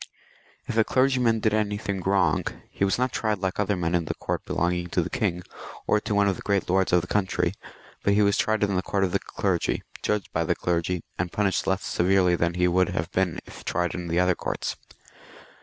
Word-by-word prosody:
If - - -4
a 110 - +6
clergyman 125 -3 +2
did 110 -1 +2
anything 105 -2 -1
wrong, 95 +1 +2 0.3
he - - -2
was 95 - +2
not 125 0 +1
tried 110 -2 0
like 95 0 -3
other 105 0 +1
men 85 -1 -1
in 85 -1 +1
the - - -3
court - - -3
belong 85 +1 0
ing 90 0 -3
to - - 0
the - - -6
king, 90 +1 -1 0.4
or 105 - +3
to 105 - -2
one 100 0 +4
of 95 - +1
the - - -9
great 100 -2 0
lords 95 +1 +2
of 90 - +5
the 90 - -8
country, 95 -3 0 0.5
but 100 - +3
he 105 - +4
was 100 0 +3
tried 110 -1 +1
in 100 -1 +1
the 90 - +2
court 100 +1 -1
of 95 - +1
the - - +1
clergy, - - -1 0.2
judged 105 -3 -1
by - - +1
the - - +1
clergy, 85 0 -1 0.2
and 85 0 -1
punished 100 -2 0
less 95 +1 0
severely 90 0 +3
than 85 0 0
he 90 0 +3
would 90 +1 +3
have 80 +1 -3
been 90 -3 0
if - - -12
tried 90 +1 -1
in 90 -1 -5
the 85 +1 +1
other 90 0 +4
courts. - - -3
95 Hz, 230 wpm, -26 LUFS, 90-105 Hz, 0.5 s, a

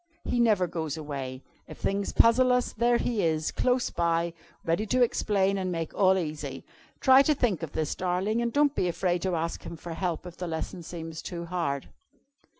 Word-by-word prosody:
He 245 - 0
never 215 -6 +4
goes 160 -3 -4
away. 135 -4 -5 0.2
If - - -10
things 200 0 -1
puzzle 250 +2 +5
us, 250 0 +1
there 235 +1 +3
He 235 -4 -1
is, 155 -1 0
close 250 0 +1
by, 170 0 0 0.3
ready 170 +7 0
to 255 +3 +3
explain 200 -4 +1
and 185 -1 -2
make 165 -2 -3
all 190 -1 +4
easy. 150 -5 -4 0.3
Try 265 0 +7
to 300 +2 +3
think 220 - 0
of 165 -3 -6
this, 155 -2 -1
darling, 185 +5 0
and 235 0 0
don't 290 +2 +3
be 185 - 0
afraid 175 0 0
to 185 -1 0
ask 165 +1 -2
Him 170 - -8
for 170 +1 -7
help 175 -1 -2
if 175 -1 -9
the 180 - -4
lesson 165 +2 -4
seems 165 -1 -7
too 170 -1 -6
hard." 165 -6 -2
180 Hz, 195 wpm, -28 LUFS, 165-220 Hz, 0.3 s, Try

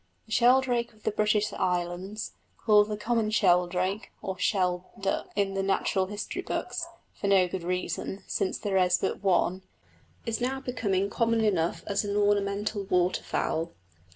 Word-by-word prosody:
The 220 - -18
sheldrake 245 0 +3
of 215 - -24
the - - +1
British 210 0 +1
Islands, 180 +4 -2 0.3
called 210 -2 +4
the 210 - -2
common 225 0 0
sheldrake 185 0 +1
(or 190 - -3
sheld 180 -2 +1 0.2
duck) 195 0 -1
in 200 -1 +1
the 195 - 0
natural 195 0 +1
history 205 +1 -4
books, 335 -1 -3 0.3
for 200 - -4
no 190 -2 +5
good 180 +1 -4
reason, 180 +2 -3
since 190 - -1
there 195 -2 -1
is 180 -1 +4
but 190 - -2
one, 185 -1 +2 0.6
is 230 0 -2
now 265 +2 -1
becoming 205 -7 -1
common 230 0 +2
enough 170 -5 +1
as 200 0 0
an 205 0 -2
ornamental 205 0 +1
waterfowl. 175 -2 0
200 Hz, 155 wpm, -28 LUFS, 185-215 Hz, 0.6 s, no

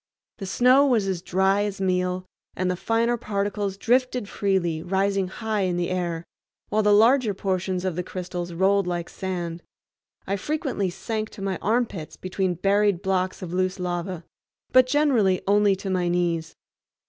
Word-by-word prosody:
The 195 - -5
snow 255 +7 +5
was 225 -7 +2
as 185 -3 -2
dry 190 +2 +2
as 205 -1 -3
meal, 180 -1 0 0.3
and 185 0 0
the - - -1
finer 230 +5 +1
particles 200 -2 -2
drifted 250 0 +1
freely, 185 -6 0
rising 195 +1 0
high 215 +2 -2
in 180 -2 0
the 175 0 -1
air, 175 -2 -2 0.4
while 215 +1 +2
the 210 0 +3
larger 225 +1 +4
portions 185 -1 -2
of 185 -3 -1
the 180 - -1
crystals 180 -1 -5
rolled 190 +2 +2
like 175 -1 -3
sand. 175 -3 -4 0.6
I 200 +1 -1
frequently 270 - -2
sank 215 +4 -4
to 200 - -9
my 195 -1 -1
armpits 215 -7 -1
between 185 -1 -2
buried 200 +1 +2
blocks 185 0 -1
of 175 -1 -6
loose 185 0 0
lava, 175 -1 -3 0.5
but 255 0 +6
generally 255 -10 +2
only 205 0 +4
to 190 0 -5
my 180 -1 +1
knees. 175 -2 -1
190 Hz, 160 wpm, -24 LUFS, 180-210 Hz, 0.6 s, but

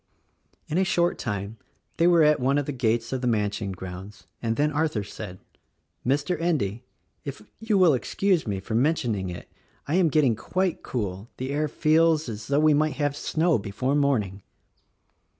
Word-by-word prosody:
In 160 - 0
a - - +4
short 175 -3 +1
time 105 0 -4 0.4
they 170 - +4
were 170 -2 +6
at 150 0 +4
one 135 +3 +2
of 145 - 0
the 145 - -3
gates 120 -2 0
of 130 - -2
the 125 - 0
mansion 105 -3 0
grounds, 95 +2 -8 0.2
and 115 -1 0
then 150 +3 +1
Arthur 150 -8 0
said, 100 -2 -8 0.7
"Mr. 145 +6 0
Endy. 125 - 0 0.4
if 140 -8 -7 0.2
you 225 -2 +1
will 180 -5 +6
excuse 175 - 0
me 100 -2 -1
for 110 +4 -6
mentioning 115 - +1
it 85 - -8 0.4
I 145 - -2
am 180 -4 +4
getting 140 -6 +3
quite 185 - -1
cool 100 -2 -4
— - - -47
the 130 +2 -4
air 150 +2 0
feels 155 +1 +3
as 110 -1 -7
though 140 +1 +2
we 155 0 +5
might 155 0 +2
have 145 -1 0
snow 160 0 +1
before 115 +7 -2
morn 140 -6 +3
ing." 95 +1 -10
135 Hz, 185 wpm, -26 LUFS, 105-155 Hz, 0.7 s, were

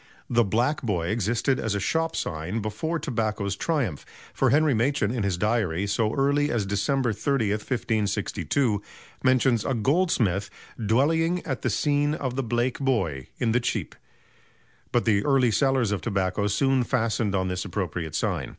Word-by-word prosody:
The 120 0 +4
"Black 120 +8 0
Boy" 90 -8 -1
existed 115 +5 0
as 110 -2 -1
a - - 0
shop 160 +10 0
sign 80 +8 -3
before 110 +11 -2
tobacco's 110 -8 -2
triumph, 125 - -1 0.3
for - - +2
Henry 150 0 +4
Machyn 120 -1 +1
in 120 - -2
his 100 -3 0
"Diary," 100 -3 0
so 105 +2 0
early 145 +1 +2
as 115 -7 0
December 120 +5 0
30, 120 -4 0
1562, 105 - -1 0.4
mentions 130 -3 +3
a 135 - -1
goldsmith 115 - +1 0.3
"dwellying 160 - +2
at 130 -6 -3
the 130 - 0
sene 145 +6 +1
of 130 -4 -3
the 135 - 0
Blake 120 +1 -1
Boy, 95 - -1
in 115 -2 +1
the 120 - +3
Cheep"; 120 - -2 1.0
but 120 - +1
the 105 -3 +3
early 135 -4 +3
sellers 135 -3 +2
of 105 - -1
tobacco 100 -2 0
soon 135 +5 +2
fastened 115 -4 0
on 95 -1 0
this 90 0 -2
appropriate 85 -5 -4
sign. - - -1
115 Hz, 160 wpm, -25 LUFS, 100-135 Hz, 1.0 s, The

